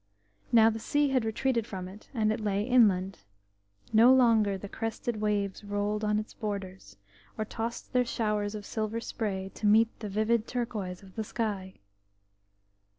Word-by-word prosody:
Now 225 Hz, -1 st, +6 dB
the 225 Hz, -, -5 dB
sea 290 Hz, +5 st, +1 dB
had 260 Hz, -3 st, +2 dB
retreated 230 Hz, +1 st, 0 dB
from 185 Hz, -2 st, -5 dB
it, 195 Hz, +3 st, -13 dB
and 215 Hz, -4 st, +1 dB
it 225 Hz, -, -4 dB
lay 205 Hz, -1 st, 0 dB
inland; 200 Hz, -6 st, +3 dB, 0.7 s
no 230 Hz, +3 st, +7 dB
longer 225 Hz, -6 st, +4 dB
the 200 Hz, -, -8 dB
crested 225 Hz, +1 st, -4 dB
waves 205 Hz, -2 st, -1 dB
rolled 205 Hz, +1 st, -2 dB
on 210 Hz, 0 st, +2 dB
its 215 Hz, +1 st, -4 dB
borders, 195 Hz, -, -6 dB, 0.4 s
or 215 Hz, -, -1 dB
tossed 230 Hz, +4 st, -5 dB
their 250 Hz, 0 st, +4 dB
showers 210 Hz, -3 st, -1 dB
of 205 Hz, -1 st, -7 dB
silver 220 Hz, +1 st, -2 dB
spray 195 Hz, -4 st, -4 dB
to 210 Hz, -, -1 dB
meet 220 Hz, +2 st, +5 dB
the 210 Hz, -, -5 dB
vivid 220 Hz, +3 st, +1 dB
turquoise 210 Hz, -7 st, -4 dB
of 190 Hz, -1 st, -15 dB
the 220 Hz, -, -3 dB
sky. 205 Hz, -4 st, -3 dB
215 Hz, 160 wpm, -29 LUFS, 205-230 Hz, 0.7 s, no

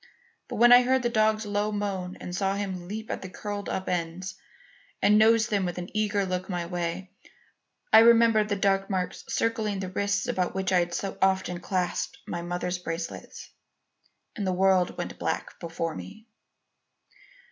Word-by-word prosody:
But -, -, -6 dB
when 240 Hz, +1 st, +6 dB
I 245 Hz, 0 st, +10 dB
heard 260 Hz, +1 st, +2 dB
the 240 Hz, -, +2 dB
dog's 215 Hz, -1 st, +2 dB
low 205 Hz, +1 st, -1 dB
moan 195 Hz, -3 st, -3 dB
and 180 Hz, -, -6 dB
saw 195 Hz, 0 st, 0 dB
him 190 Hz, -3 st, -4 dB
leap 220 Hz, +3 st, -5 dB
at -, -, -4 dB
the 190 Hz, -, -7 dB
curled 205 Hz, +1 st, -5 dB
up 190 Hz, -, -3 dB
ends, 180 Hz, +2 st, -3 dB, 0.7 s
and 210 Hz, +1 st, +5 dB
nose 220 Hz, 0 st, +5 dB
them 205 Hz, -4 st, 0 dB
with 175 Hz, -1 st, -3 dB
an 180 Hz, +3 st, -7 dB
eager 210 Hz, -2 st, +1 dB
look 185 Hz, 0 st, -3 dB
my 175 Hz, -2 st, -2 dB
way, 175 Hz, +1 st, -4 dB, 0.8 s
I 220 Hz, -, +11 dB
remembered 230 Hz, -2 st, +5 dB
the 205 Hz, -, +1 dB
dark 195 Hz, -1 st, +1 dB
marks 185 Hz, -2 st, -2 dB
circling 220 Hz, -3 st, -1 dB
the 190 Hz, -1 st, -4 dB
wrists 200 Hz, +1 st, 0 dB
about 180 Hz, -1 st, -1 dB
which 190 Hz, 0 st, -1 dB
I 185 Hz, -, +5 dB
had 175 Hz, 0 st, -1 dB
so 195 Hz, -, -4 dB
often 190 Hz, -2 st, +1 dB
clasped 180 Hz, 0 st, -2 dB
my 175 Hz, -, -4 dB
mother's 175 Hz, +1 st, -3 dB
bracelets, 165 Hz, -1 st, -6 dB, 0.8 s
and 200 Hz, -3 st, -3 dB
the 185 Hz, -, +1 dB
world 185 Hz, -1 st, +2 dB
went -, -, -5 dB
black -, -, -3 dB
before 165 Hz, -1 st, -3 dB
me. 95 Hz, -, -10 dB
190 Hz, 175 wpm, -27 LUFS, 180-210 Hz, 0.8 s, I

